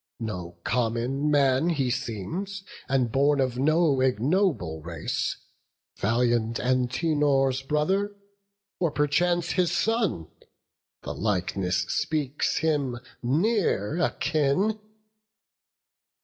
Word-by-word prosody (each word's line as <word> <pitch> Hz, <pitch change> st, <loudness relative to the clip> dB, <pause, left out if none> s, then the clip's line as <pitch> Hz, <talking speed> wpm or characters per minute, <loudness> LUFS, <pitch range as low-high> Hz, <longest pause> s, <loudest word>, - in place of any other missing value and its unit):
no 90 Hz, -7 st, -5 dB
common 125 Hz, +4 st, 0 dB
man 140 Hz, +1 st, +3 dB
He 135 Hz, -7 st, 0 dB
seems, 145 Hz, -, -4 dB, 0.3 s
and 130 Hz, -3 st, +1 dB
born 140 Hz, +2 st, +3 dB
of 130 Hz, -2 st, 0 dB
no 155 Hz, 0 st, +3 dB
ignoble 130 Hz, -, +1 dB
race; 85 Hz, 0 st, -3 dB, 0.6 s
Valiant 115 Hz, +1 st, +1 dB
Antenor's 135 Hz, +1 st, +1 dB
brother, 190 Hz, +9 st, 0 dB, 0.6 s
or 170 Hz, -, +2 dB
perchance 175 Hz, +4 st, +1 dB
His 180 Hz, -3 st, +1 dB
son; 215 Hz, -, 0 dB, 0.8 s
the -, -, -4 dB
likeness 90 Hz, -2 st, -1 dB
speaks 150 Hz, -3 st, -1 dB
him 145 Hz, -6 st, 0 dB, 0.2 s
near 160 Hz, -, +1 dB
akin." 160 Hz, +6 st, +1 dB
135 Hz, 90 wpm, -26 LUFS, 120-165 Hz, 0.8 s, man